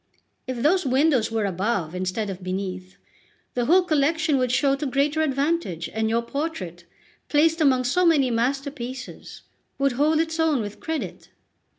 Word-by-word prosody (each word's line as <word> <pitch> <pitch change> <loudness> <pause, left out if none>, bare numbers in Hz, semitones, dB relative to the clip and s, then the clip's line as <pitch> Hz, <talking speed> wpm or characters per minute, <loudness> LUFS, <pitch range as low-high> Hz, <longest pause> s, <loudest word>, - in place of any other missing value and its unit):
If 255 -2 -3
those 360 +5 +3
windows 265 -3 +2
were 220 -2 0
above 190 -3 -1
instead 185 +3 -2
of 190 0 -8
beneath, 185 0 -5 0.6
the 245 -1 0
whole 360 +7 +5
collection 310 -2 +1
would 255 -1 +1
show 275 +1 +3
to 295 - -3
greater 285 +4 +1
advantage, 280 - -1
and 220 0 0
your 230 +1 +1
portrait, 235 - -5 0.4
placed 320 +2 +3
among 260 -4 +4
so 275 +9 +1
many 295 -7 +4
masterpieces, 260 +1 -4 0.3
would 275 0 +2
hold 300 +5 +2
its 325 0 -1
own 320 -4 +2
with 210 -2 -5
credit." 320 -1 -5
265 Hz, 155 wpm, -24 LUFS, 220-310 Hz, 0.6 s, whole